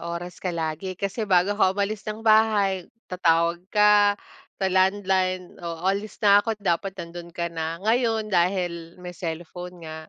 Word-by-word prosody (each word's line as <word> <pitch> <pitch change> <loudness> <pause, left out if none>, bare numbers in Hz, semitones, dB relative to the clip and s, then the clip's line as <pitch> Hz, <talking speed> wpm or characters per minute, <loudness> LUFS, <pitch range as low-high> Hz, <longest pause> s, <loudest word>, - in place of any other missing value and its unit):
oras 175 +1 -6
ka 185 - -1
lagi. 165 +3 -3
Kasi 200 +3 -3
bago 185 +2 +3
ka 190 -3 +4
umalis 205 +1 -2
ng 215 +1 -5
bahay, 210 -4 +3 0.2
tatawag 170 -1 +1
ka 210 -1 +5 0.4
sa 190 - 0
landline. 185 -1 +1
“Oh, 170 0 -6
alis 200 +2 -2
na 200 0 +7
ako’t 225 -2 -3
dapat 190 +1 -1
nandun 170 0 -8
ka 170 0 -2
na.” 165 0 -3
Ngayon 225 -1 +1
dahil 175 -2 0
may 180 0 -7
cellphone 175 +1 -7
nga, 160 0 -8
185 Hz, 155 wpm, -24 LUFS, 170-205 Hz, 0.4 s, na